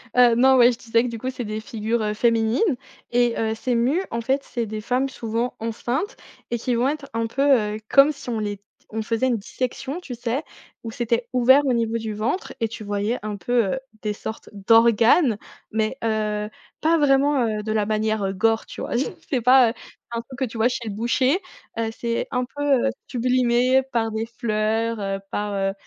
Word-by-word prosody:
Heu, 245 -2 +6
non, 260 +2 +5
ouais, 245 0 +7
je - - -8
disais 230 -1 +1
que, - - -1
du 230 - -5
coup, 260 +3 -3
c'est 250 -3 -5
des 215 +1 -3
figures, 225 -1 -2
heu, 210 0 -1
féminines 230 - +2 0.4
et 240 -1 +3
heu, 220 0 0
ces 245 +2 -1
mu 260 +10 +2
en 230 - -2
fait, 270 +4 0
c'est 235 -3 -3
des 215 0 -5
femmes, 255 +4 0
souvent 230 0 -3
enceintes 240 - -3 0.3
et 235 - -1
qui 245 +1 -1
vont 245 +3 +2
être 295 -2 -5
un 230 0 -1
peu, 270 - -3 0.3
heu, 215 - -6
comme 275 +2 +6
si 275 -3 -9
on 225 -2 -1
les 205 -1 -3
t 200 - -42 0.3
on 220 0 -3
faisait 230 +3 0
une 245 - +2
dissection, 255 - -4
tu 255 -9 -7
sais? 245 +5 -2 0.4
Où 225 - -4
c'était 235 +1 -1
ouvert 260 +3 +5
au 255 - +2
niveau 230 -1 0
du 220 -1 -4
ventre 220 - -2
et 225 - +1
tu 215 -1 -8
voyais 205 +4 -1
un 210 -1 -4
peu, 225 +2 +1
heu, 265 - -2 0.2
des 210 -1 -1
sortes 220 +1 -7
d'organes, 230 - +4 0.4
mais 220 -1 0
heu, 210 -1 -1 0.3
pas 330 +1 +3
vraiment, 280 -3 +3
heu, 215 -1 -2
de 215 - -3
la 210 -1 +1
manière, 215 0 0
heu, 195 - 0
gore, 225 +3 +1
tu - - -10
vois? - - -5 0.4
c'est 260 -5 0
pas, 250 -1 +6
heu, - - -9 0.4
un 235 0 -2
truc 260 +3 -12
que 260 - +1
tu 230 - -10
vois 225 +2 +3
chez 235 -2 -4
le 205 - -3
boucher, 255 - +2 0.4
heu, 225 -1 0
c'est 235 0 -2
un 250 -1 0
peu, 290 +3 -6 0.2
heu, - - +3 0.2
sublimé 250 +1 +2
par 225 -1 0
des 220 +1 -2
fleurs, 225 0 -1
heu, 195 0 -2
par, 205 0 -2
heu, 195 0 0
230 Hz, 215 wpm, -23 LUFS, 220-255 Hz, 0.4 s, ouais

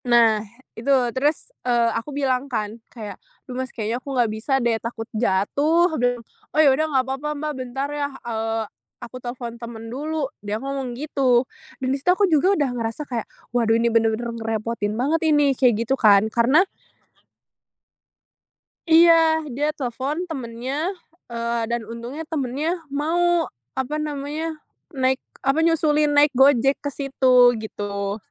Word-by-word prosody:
Nah 230 -3 +4 0.3
itu 235 +5 -6 0.2
terus, 290 +4 -1
eee, 240 -2 +2
aku 230 +5 -4
bilang 270 -1 0
kan 215 -3 -3
kayak, 210 -5 -9 0.2
"Loh 255 - -8
mas 260 - -5
kayaknya 230 +1 -3
aku 280 - -9
nggak 235 -3 +2
bisa 220 +6 -3
deh 235 -3 +1
takut 230 -1 -5
jatuh," 285 - +2
aku - - -1
bilang. 245 -1 0 0.3
"Oh - - +4
ya 290 - +7
udah 310 +4 +1
gak 265 -3 +2
papa 270 +3 -4
Mbak 300 +1 -3
bentar 255 +2 -3
ya, 290 -1 -2 0.2
eee, 225 -1 -2 0.4
aku 240 +1 -8
telepon 240 -1 -6
temen 230 -1 -8
dulu," 305 +2 -2 0.2
dia 205 +1 -3
ngomong 270 -1 -4
gitu, 265 -4 +2 0.3
dan 260 - -3
di - - 0
situ 320 - -1
aku 410 - +4
juga 365 +6 +4
udah 285 -3 +1
ngerasa 230 +3 -3
kayak 240 -5 -4 0.3
waduh 230 -2 +3
ini 235 0 +2
bener-bener 230 +1 +1
ngerepotin 220 -1 -2
banget 290 +7 +1
ini 295 -2 +4
kayak 240 -4 +2
gitu 265 - +1
kan. 205 -2 +6
Karena 260 +10 +4 2.2
Iya 325 -1 +6
dia 295 +4 0
telepon 270 +6 -3
temennya, 265 +1 -4 0.4
eee, 235 0 -2
dan 235 -1 -2
untungnya 235 +8 -7
temennya 305 +3 -2
mau, 335 +4 +1 0.3
apa 265 +3 -2
namanya, 305 +2 -4 0.3
naik, 265 -4 0 0.2
apa, 275 +4 +3
nyusulin 305 -2 +3
naik 290 0 +5
GoJek 270 0 +4
ke 285 - -2
situ 260 -3 +4
gitu. 200 -1 -4
255 Hz, 155 wpm, -23 LUFS, 230-295 Hz, 2.2 s, ya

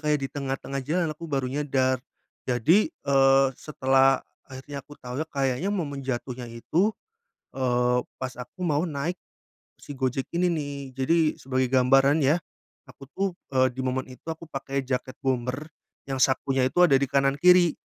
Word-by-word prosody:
kayak 150 -2 0
di 135 - -2
tengah-tengah 135 0 -3
jalan 160 +4 -1
aku 165 +2 -9
baru 135 -2 -1
nyadar 130 -3 +1 0.5
jadi, 150 - +3
eee, 135 - +3
setelah 135 -2 +2 0.2
akhirnya 140 +1 -7
aku 145 +2 -15
tau 125 +2 -6
ya 160 - -2
kayaknya 135 +4 -1
momen 155 -9 -2
jatuhnya 125 -1 -4
itu, 165 - 0 0.6
eee, 125 -1 +1 0.2
pas 130 0 -5
aku 180 +9 -8
mau 160 0 +1
naik 160 +4 -3 0.6
si 145 - -9
Gojek 130 0 -1
ini 175 +1 +2
nih. 145 -3 -3 0.2
Jadi 135 +6 +1 0.2
sebagai 130 -1 -1
gambaran 135 +4 +4
ya 145 +4 +4 0.5
aku 135 0 -14
tuh, 195 +6 -1 0.3
eee, 130 -1 +4
di 130 - -4
momen 130 0 -1
itu 130 +4 -15
aku 160 +1 -6
pakai 135 -2 -4
jaket 130 0 -3
bomber 130 +2 -1 0.4
yang 135 -1 -3
sakunya 135 0 +2
itu - - -12
ada 170 -6 +5
di 140 - 0
kanan 140 0 +2
kiri, 180 -1 +6
135 Hz, 160 wpm, -26 LUFS, 130-150 Hz, 0.6 s, kiri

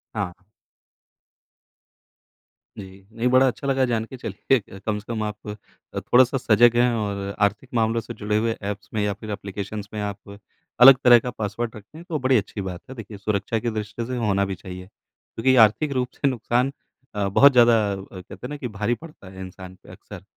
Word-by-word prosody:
हाँ। 95 -4 -2 2.4
जी। 95 -1 -11
नहीं 115 +2 -1
बड़ा 130 +1 +5
अच्छा 130 +3 -3
लगा 135 -1 +2
जानके 115 +1 -3
चलिए 105 -1 -2
कम 105 +1 -2
से 105 - -15
कम 110 -1 -2
आप 105 0 -6
अ, 105 0 -9
थोड़ा-सा 130 +2 +3
सजग 120 0 +4
हैं। 120 0 +4
और 100 -2 -3
आर्थिक 120 +5 -10
मामलों 115 0 +1
से 120 +2 -8
जुड़े 105 0 -1
हुए 115 +1 0
ऐप्स 100 +1 -5
में 110 - 0
या 105 - 0
फ़िर 105 +2 -8
एप्लीकेशंस 100 +1 -6
में 105 - -3
आप 100 0 -6 0.4
अलग 130 0 +10
तरह 120 -1 +8
का 125 +2 -5
पासवर्ड 110 +1 -4
रखते 110 +9 -13
हैं 170 - -11
तो 155 - -1
बड़ी 130 -1 +3
अच्छी 100 0 -3
बात 90 -2 -6
है। 130 - -8
देखिए 110 -2 -9
सुरक्षा 100 +2 -1
की 120 - -2
दृष्टि 110 +1 -4
से 125 +1 -4
होना 100 -4 +1
भी 95 -1 -4
चाहिए। 90 +1 -9
क्योंकि 115 +4 -6
ये 130 - +6
आर्थिक 140 +8 -4
रूप 125 -1 -1
से 140 - 0
नुक़सान 125 +1 0 0.4
अ, 100 -1 0
बहुत 140 +8 +6
ज़्यादा 120 -2 +6 0.2
अ, - - -2 0.3
कहते - - -12
हैं - - -12
ना, 150 - -5
कि 130 -3 -5
भारी 105 +2 -1
पड़ता 155 - -14
है 95 0 -12
इंसान 95 0 -10
पे - - -16
अक्सर। - - -12
110 Hz, 200 wpm, -23 LUFS, 100-125 Hz, 2.4 s, अलग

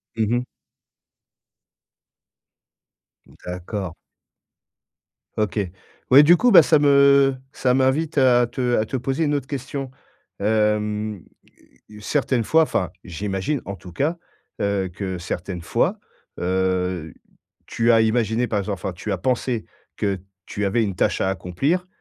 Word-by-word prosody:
Mmh 110 -2 0
mh. 125 - -3 3.0
D'accord. 90 0 -5 1.4
OK. 105 -2 0 0.5
Ouais 135 +3 +10
du 170 +4 +6
coup 245 +5 +3
bah 185 - +10
ça 155 0 +4
me 140 -1 +5 0.2
ça 125 -3 +1
m'invite 135 +5 +1
à 125 -2 +5
te 125 0 -1
à 110 - +1
te 120 - -5
poser 135 +5 -1
une 150 -1 +1
autre 140 -2 -3
question. 135 0 -5 0.5
Hem, 105 -1 0 0.8
certaines 130 +1 0
fois, 160 +8 +4
enfin, 90 - -1
j'imagine 95 - -3
en 100 - -5
tout 90 -2 -12
cas, 150 - -1 0.4
heu, 100 -2 0
que 95 0 -4
certaines 90 +1 -5
fois, 85 - 0 0.4
heu, 90 -3 -1 0.5
tu 115 +1 +2
as 115 -1 +5
imaginé 110 +1 +1
par 105 - -1
exemple 100 +1 -3
enfin, 95 - -4
tu 90 +5 -6
as 95 - 0
pensé 125 0 -1 0.3
que 100 -2 -1 0.3
tu 105 - -4
avais 115 +4 +1
une 100 -3 -3
tâche - - 0
à 95 - +1
accomplir 135 - -1
110 Hz, 135 wpm, -22 LUFS, 95-135 Hz, 3.0 s, Ouais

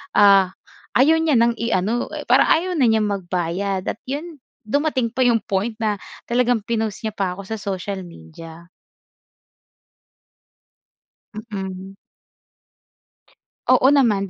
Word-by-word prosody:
ah, 200 -2 +6 0.5
ayaw 310 +6 +5
niya 320 -3 +2
ng 235 0 +2
i-ano, 230 +1 0
eh - - -5
parang - - +4
ayaw 355 +3 -2
na 255 - +4
niyang 220 -1 +3 0.2
magbayad 185 +2 -2
at 215 - -4
'yon 300 +3 -5 0.3
dumating 260 -1 0
pa 260 - -1
yung 245 -2 +4
point 210 +3 -2
na 220 -2 0 0.3
talagang 245 0 +2
pinost 220 -2 -2
niya 215 - -2
pa 190 -3 -2
'ko 200 - -8
sa 220 - -5
social 200 -2 -4
media. 165 - -12 2.7
Mm. 195 -3 -7 1.7
Oo 265 - +5
naman, 225 -9 +2
215 Hz, 120 wpm, -21 LUFS, 190-245 Hz, 2.7 s, ah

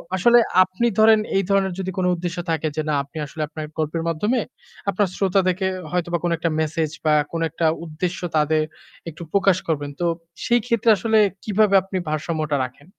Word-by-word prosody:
আসলে 240 +6 +5 0.2
আপনি 185 +5 -2
ধরেন 220 0 +7 0.2
এই 195 - +2
ধরনের 195 -1 +2
যদি 190 0 -3
কোন 185 - +1
উদ্দেশ্য 175 0 -4
থাকে 160 -1 0
যে 155 - 0
না - - +1
আপনি 145 +3 -13
আসলে 155 +2 -7
আপনার 155 0 -6
গল্পের 160 +1 -2
মাধ্যমে 210 +10 0 0.5
আপনার 200 +1 +1
শ্রোতাদেরকে 190 -1 +1 0.2
হয়তোবা 175 -1 0
কোন 175 - 0
একটা 165 +1 -1
মেসেজ 155 0 -1
বা 155 - +4 0.2
কোন 165 - -3
একটা 165 - -2 0.2
উদ্দেশ্য 170 +3 -3 0.2
তাদের 155 +1 +2 0.5
একটু 165 +1 -9
প্রকাশ 195 -2 +3
করবেন। 145 -3 -1
তো 175 - 0 0.4
সেই 240 0 +3
ক্ষেত্রে 235 -2 +1
আসলে 220 +4 +1 0.3
কিভাবে 210 -1 +3
আপনি 195 0 -4
ভারসাম্যটা 155 -1 -1
রাখেন? 130 +4 -13
175 Hz, 175 wpm, -22 LUFS, 155-195 Hz, 0.5 s, ধরেন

